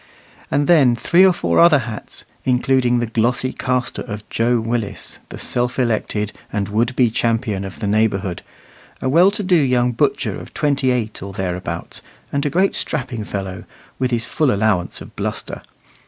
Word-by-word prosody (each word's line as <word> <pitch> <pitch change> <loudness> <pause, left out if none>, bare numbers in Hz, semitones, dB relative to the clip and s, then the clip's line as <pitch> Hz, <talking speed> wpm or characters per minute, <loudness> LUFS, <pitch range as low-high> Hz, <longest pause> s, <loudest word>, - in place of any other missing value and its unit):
And 145 - +1
then 140 -8 +5
three 170 +9 +4
or 190 - +7
four 175 - +1
other 170 -3 +7
hats, 115 -5 -6 0.2
including 125 -1 +2
the 120 - 0
glossy 120 +3 0
castor 125 -1 -2
of 105 -2 -7
Joe 120 +1 +2
Willis, 115 -2 -3
the - - -8
self 125 0 -2
elected 110 -4 0 0.2
and 100 -1 -2
would 115 +4 0
be 125 -4 +3
champion 115 -4 0
of 95 -1 -7
the 110 - -4
neighbourhood, 100 -3 0 0.6
a - - -2
well 170 +8 +6
to 205 +1 -4
do 185 -1 +1
young 125 -5 +3
butcher 115 - 0
of - - -12
twenty 140 -3 +1
eight 115 -4 -1
or 100 +1 -7
thereabouts, 90 -1 -4 0.3
and 140 0 0
a - - +1
great 185 +6 +2
strapping 125 -7 -2
fellow, 95 -2 -5 0.4
with 130 -1 +1
his 115 -2 -1
full 150 +2 +1
allowance 100 -4 0
of - - -12
bluster. - - -4
120 Hz, 170 wpm, -20 LUFS, 105-130 Hz, 0.6 s, or